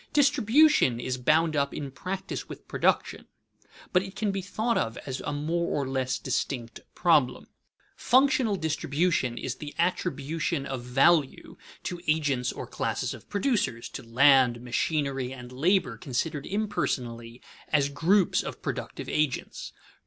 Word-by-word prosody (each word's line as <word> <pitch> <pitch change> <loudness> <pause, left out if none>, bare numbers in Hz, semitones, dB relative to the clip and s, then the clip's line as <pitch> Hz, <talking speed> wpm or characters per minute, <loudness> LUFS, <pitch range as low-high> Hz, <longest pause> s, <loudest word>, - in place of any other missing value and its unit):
Distribution 280 - +4
is 125 +1 -3
bound 155 +5 +3
up 140 -1 0
in 140 -2 -5
practice 190 +7 -5
with - - -10
production, - - 0 0.7
but 180 - +5
it 190 0 -8
can 210 -1 0
be 195 0 -3
thought 220 +5 -1
of 115 +1 -1
as 130 -1 -4
a - - -3
more 165 +4 -1
or 140 - -2
less 130 -2 -1
distinct 125 -2 -3 0.2
problem. 150 -8 +2 0.5
Functional 260 -4 +3
distribution 160 -5 0
is - - -4
the 150 -1 -8
attribution 165 -3 -1
of 135 -3 -4
value 135 +4 +2 0.3
to 175 -1 -5
agents 145 -5 +1
or - - -6
classes - - -2
of - - -13
producers, 205 - 0
to - - -7
land, 125 0 +4
machinery, 135 +1 -1
and 125 -2 -9
labor 155 - +1
considered 145 +5 -3
impersonally 120 - -3 0.3
as 145 -2 +3
groups 170 +7 +2
of - - -7
productive - - -5
agents. 150 -4 -2
145 Hz, 140 wpm, -27 LUFS, 130-180 Hz, 0.7 s, but